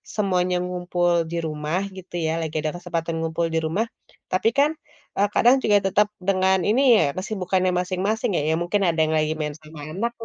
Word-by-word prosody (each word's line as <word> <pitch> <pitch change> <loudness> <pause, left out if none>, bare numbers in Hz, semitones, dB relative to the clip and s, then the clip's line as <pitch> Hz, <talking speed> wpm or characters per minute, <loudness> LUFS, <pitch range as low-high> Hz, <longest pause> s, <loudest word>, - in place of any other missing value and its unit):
semuanya 185 -3 +1
ngumpul 175 -1 0
di 170 - -2
rumah 155 +3 -2 0.2
gitu 185 -1 -12
ya, 160 - +1
lagi 160 -1 -5
ada 155 0 -2
kesempatan 170 -2 -3
ngumpul 165 +1 -1
di - - +1
rumah, 185 +8 0 0.4
tapi 185 +4 +2
kan, 295 +3 +3 0.4
eee, 200 - +3
kadang 240 +4 +5
juga 205 -1 +4
tetap 205 +2 +3
dengan 190 0 +2
ini 225 +6 +3 0.2
ya - - +3
kesibukannya 185 -1 -1
masing-masing 195 +4 -1
ya, - - +1
ya - - +2
mungkin 195 +4 0
ada 170 -3 +1
yang 160 0 +2
lagi 155 0 +1
main 150 -1 -3
sama 155 0 -13 0.2
anak, 230 +5 -1
180 Hz, 185 wpm, -23 LUFS, 165-200 Hz, 0.4 s, kadang